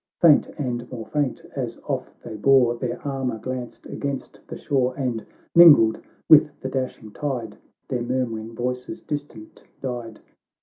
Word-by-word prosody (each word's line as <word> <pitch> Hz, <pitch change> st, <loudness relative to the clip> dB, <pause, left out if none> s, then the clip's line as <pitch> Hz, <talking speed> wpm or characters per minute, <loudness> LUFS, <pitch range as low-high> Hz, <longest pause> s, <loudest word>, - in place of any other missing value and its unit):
Faint 160 Hz, -4 st, +6 dB
and 125 Hz, -4 st, -3 dB
more 115 Hz, -3 st, -6 dB
faint, 145 Hz, -4 st, -2 dB
as 125 Hz, -4 st, -3 dB
off 135 Hz, -3 st, -3 dB
they 115 Hz, -2 st, -6 dB
bore, 125 Hz, +2 st, +4 dB
Their 120 Hz, 0 st, -4 dB
armour 130 Hz, -4 st, -2 dB
glanced 125 Hz, +1 st, -6 dB
against 140 Hz, -2 st, -5 dB
the -, -, -7 dB
shore, 130 Hz, -3 st, 0 dB
And, 125 Hz, -5 st, -2 dB, 0.3 s
mingled 145 Hz, -10 st, +8 dB, 0.3 s
with 150 Hz, -1 st, +6 dB
the 130 Hz, -, -4 dB
dashing 130 Hz, -5 st, -4 dB
tide. 125 Hz, -5 st, -4 dB, 0.3 s
Their 125 Hz, -3 st, -2 dB
murmuring 115 Hz, -2 st, -3 dB
voices 125 Hz, 0 st, -4 dB
distant 145 Hz, -7 st, -7 dB, 0.2 s
died. 120 Hz, -4 st, -5 dB
125 Hz, 140 wpm, -24 LUFS, 115-135 Hz, 0.3 s, mingled